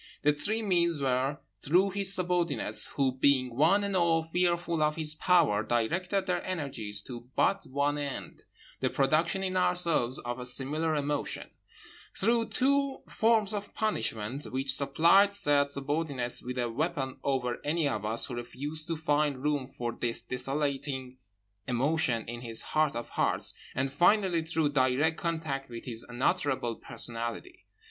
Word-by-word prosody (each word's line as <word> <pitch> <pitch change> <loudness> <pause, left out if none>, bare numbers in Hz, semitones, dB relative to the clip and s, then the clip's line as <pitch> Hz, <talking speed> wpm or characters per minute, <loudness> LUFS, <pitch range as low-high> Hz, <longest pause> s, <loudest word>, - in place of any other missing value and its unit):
The 150 0 +4
three 215 +9 -2
means 170 -5 +2
were: 135 +1 0 0.2
through 180 +7 +3
his 195 0 +2
subordinates, 175 - +1
who 135 -2 0
being 130 -3 +3
one 170 +9 +4
and 200 -1 -2
all 170 -2 +3
fearful 170 0 0
of 150 0 +2
his 155 -2 +2
power 155 - +3
directed 175 - 0
their 180 -2 -1
energies 130 - -4
to 120 0 -9
but 195 0 +1
one 145 +2 0
end—the 140 -2 -6
production 160 +7 +1
in 185 -1 -2
ourselves 170 -9 +2
of 120 +1 -5
a 125 - -5
similar 150 +5 0
emotion; 145 0 -2 0.7
through 230 +3 +2
two 275 +1 +1
forms 220 -2 +2
of 205 -1 -5
punishment, 120 - -2
which 135 0 -1
supplied 170 +9 +4
said 145 -8 +3
subordinates 140 -3 -2
with 125 +1 -6
a 120 -1 0
weapon 130 +1 -2
over 130 -3 -1
any 155 0 +1
of 110 -7 -2
us 110 +2 +1
who - - -7
refused 145 +6 -3
to 165 -1 -2
find 145 -3 0
room 145 -3 0
for 120 -3 -4
this 115 0 -1
desolating 135 0 -3 0.5
emotion 125 -2 +1
in 120 +1 -6
his 115 -2 -4
heart 155 -3 +1
of 120 - -5
hearts; - - 0 0.2
and, 135 +1 -1
finally, 180 +1 +3
through 160 -2 0
direct 145 +3 +2
contact 155 -5 -3
with 115 -1 -8
his 115 -2 -3
unutterable 130 -2 0
personality. 115 0 -5
145 Hz, 150 wpm, -29 LUFS, 125-170 Hz, 0.7 s, The